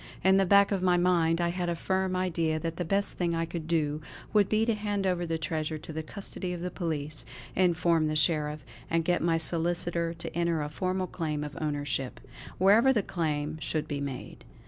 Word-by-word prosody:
In 190 Hz, +1 st, +5 dB
the 195 Hz, -1 st, +3 dB
back 200 Hz, +1 st, +6 dB
of 195 Hz, -2 st, 0 dB
my 180 Hz, -1 st, +3 dB
mind 175 Hz, -2 st, +3 dB
I 170 Hz, 0 st, +1 dB
had 175 Hz, 0 st, -2 dB
a 170 Hz, -, 0 dB
firm 190 Hz, +2 st, 0 dB
idea 165 Hz, -4 st, 0 dB
that 165 Hz, +1 st, -4 dB
the 180 Hz, -, -1 dB
best 195 Hz, +4 st, 0 dB
thing 170 Hz, -2 st, +1 dB
I 165 Hz, 0 st, 0 dB
could 165 Hz, -1 st, -6 dB
do 155 Hz, -2 st, 0 dB, 0.3 s
would 205 Hz, -2 st, +4 dB
be 220 Hz, +1 st, +3 dB
to 230 Hz, -, +2 dB
hand 205 Hz, -2 st, -2 dB
over 175 Hz, -2 st, 0 dB
the 165 Hz, 0 st, -1 dB
treasure 155 Hz, -1 st, -2 dB
to 160 Hz, +1 st, -9 dB
the 160 Hz, -, -3 dB
custody 185 Hz, +1 st, -4 dB
of 175 Hz, -, -5 dB
the 180 Hz, 0 st, -3 dB
police; 155 Hz, -4 st, -4 dB, 0.3 s
inform 170 Hz, -3 st, +3 dB
the 155 Hz, -, -1 dB
Sheriff; 150 Hz, -2 st, +1 dB, 0.2 s
and 165 Hz, 0 st, +1 dB
get 175 Hz, 0 st, +2 dB
my 165 Hz, 0 st, +2 dB
solicitor 170 Hz, 0 st, 0 dB
to 165 Hz, -, -6 dB
enter 170 Hz, -2 st, +1 dB
a 150 Hz, -, -4 dB
formal 185 Hz, +4 st, -1 dB
claim 155 Hz, -4 st, -3 dB
of 150 Hz, -1 st, -6 dB
ownership, 145 Hz, -3 st, -2 dB, 0.4 s
wherever 210 Hz, +8 st, +6 dB
the 220 Hz, -6 st, +2 dB
claim 155 Hz, -3 st, -2 dB
should 150 Hz, +1 st, -1 dB
be 140 Hz, -1 st, -3 dB
made. 135 Hz, -3 st, -6 dB
170 Hz, 210 wpm, -29 LUFS, 155-185 Hz, 0.4 s, back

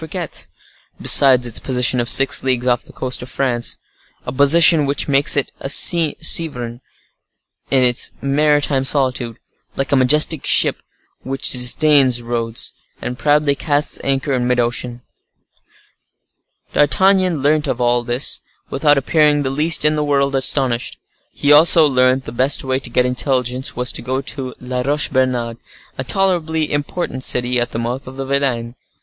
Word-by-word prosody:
Fouquet's, 160 Hz, 0 st, -6 dB, 0.5 s
besides 130 Hz, -3 st, +4 dB
its 120 Hz, -2 st, -2 dB
position 125 Hz, -1 st, -1 dB
of 120 Hz, -, -2 dB
six 135 Hz, +1 st, +4 dB
leagues 130 Hz, -2 st, -1 dB
off 120 Hz, -1 st, 0 dB
the -, -, -16 dB
coast 130 Hz, -1 st, -5 dB
of 125 Hz, -, -10 dB
France; 120 Hz, -3 st, -2 dB, 0.5 s
a -, -, -5 dB
position 150 Hz, +3 st, +4 dB
which 140 Hz, 0 st, -3 dB
makes 140 Hz, 0 st, +3 dB
it 140 Hz, -, -1 dB
a 135 Hz, -, -6 dB
sovereign 150 Hz, -7 st, +3 dB, 0.9 s
in 130 Hz, -2 st, +2 dB
its 120 Hz, -1 st, +2 dB
maritime 145 Hz, -1 st, 0 dB
solitude, 130 Hz, -4 st, -1 dB, 0.4 s
like 135 Hz, -, -4 dB
a -, -, +3 dB
majestic 150 Hz, +3 st, +1 dB
ship -, -, +1 dB, 0.4 s
which 135 Hz, +1 st, -2 dB
disdains 130 Hz, 0 st, +3 dB
roads, 115 Hz, -1 st, -4 dB, 0.3 s
and 125 Hz, 0 st, -7 dB
proudly 150 Hz, -1 st, +1 dB
casts 145 Hz, +1 st, 0 dB
anchor 135 Hz, +1 st, -1 dB
in 125 Hz, -1 st, -2 dB
mid 125 Hz, 0 st, 0 dB
ocean. 120 Hz, 0 st, -3 dB, 1.7 s
D'Artagnan 185 Hz, 0 st, +1 dB
learnt 150 Hz, +1 st, 0 dB
all 120 Hz, 0 st, 0 dB
this 120 Hz, +2 st, 0 dB, 0.3 s
without 145 Hz, +1 st, +1 dB
appearing 145 Hz, +1 st, +1 dB
the 130 Hz, -, -3 dB
least 150 Hz, +3 st, +2 dB
in 150 Hz, 0 st, +2 dB
the 150 Hz, -, -2 dB
world 140 Hz, -1 st, -1 dB
astonished. 130 Hz, -2 st, -1 dB, 0.3 s
He 145 Hz, -, -1 dB
also 160 Hz, +2 st, +5 dB
learnt 130 Hz, -1 st, +1 dB
the -, -, -8 dB
best 130 Hz, +4 st, +1 dB
way 130 Hz, 0 st, -2 dB
to -, -, -6 dB
get 125 Hz, -, 0 dB
intelligence 125 Hz, 0 st, -2 dB
was 125 Hz, 0 st, -3 dB
to -, -, -6 dB
go 130 Hz, +2 st, -3 dB
to 135 Hz, -2 st, -5 dB
La 125 Hz, 0 st, -5 dB
Roche 145 Hz, +3 st, 0 dB
Bernard, 125 Hz, -3 st, -2 dB, 0.4 s
a 130 Hz, -, -5 dB
tolerably 160 Hz, -2 st, -1 dB
important 145 Hz, -2 st, -4 dB
city 125 Hz, 0 st, +1 dB
at 120 Hz, -, -2 dB
the -, -, -7 dB
mouth 120 Hz, +3 st, -5 dB
of 130 Hz, +1 st, -11 dB
the 135 Hz, -, -5 dB
Vilaine. 130 Hz, -4 st, -2 dB
135 Hz, 155 wpm, -16 LUFS, 125-145 Hz, 1.7 s, also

